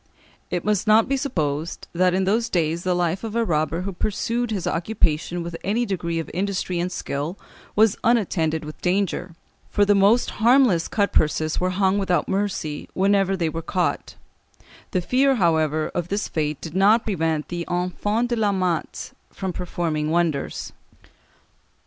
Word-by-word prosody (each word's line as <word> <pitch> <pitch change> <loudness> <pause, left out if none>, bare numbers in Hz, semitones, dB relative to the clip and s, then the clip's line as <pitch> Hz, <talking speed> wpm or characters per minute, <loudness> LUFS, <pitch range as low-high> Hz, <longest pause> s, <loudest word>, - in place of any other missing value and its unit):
It 175 - -2
must 210 0 +1
not 215 +1 +5
be 275 - +1
supposed 165 - -2
that 180 +1 +2
in 190 - +1
those 225 +5 +1
days 165 -2 0
the 185 -1 +1
life 175 +2 0
of 225 -1 -5
a 235 0 +2
robber 160 -1 0
who 195 +1 -4
pursued 230 +5 -1
his 200 -5 -2
occupation 170 -2 0
with 170 0 -6
any 225 +5 0
degree 170 -5 -2
of 165 - -3
industry 185 -2 -1
and 180 +1 -1
skill 155 +1 -4 0.4
was 215 -1 +4
unattended 165 -9 +1
with 155 - -9
danger, 180 -2 -1 0.3
for 205 - +3
the 205 - +4
most 205 +5 +4
harmless 235 -8 +4
cut 200 -2 0
purses 155 0 +1
were 185 - +1
hung 190 +1 +1
without 180 -3 +1
mercy 190 -7 -2
whenever 195 0 +2
they 170 -2 0
were 165 +1 -3
caught; 175 +2 -2 0.7
the 185 - 0
fear, 265 +8 +3
however, 160 - +1
of 175 -1 -2
this 200 +3 -2
fate 150 -2 -2
did 160 - -7
not 205 +5 +4
prevent 160 -7 -1
the 175 -1 -3
Enfants 205 +6 -1
de 240 - +1
la 215 -3 +1
Matte 180 -4 -2 0.2
from 190 -2 -4
performing 160 -3 -2
wonders. 165 -4 -1
185 Hz, 165 wpm, -23 LUFS, 165-205 Hz, 0.7 s, not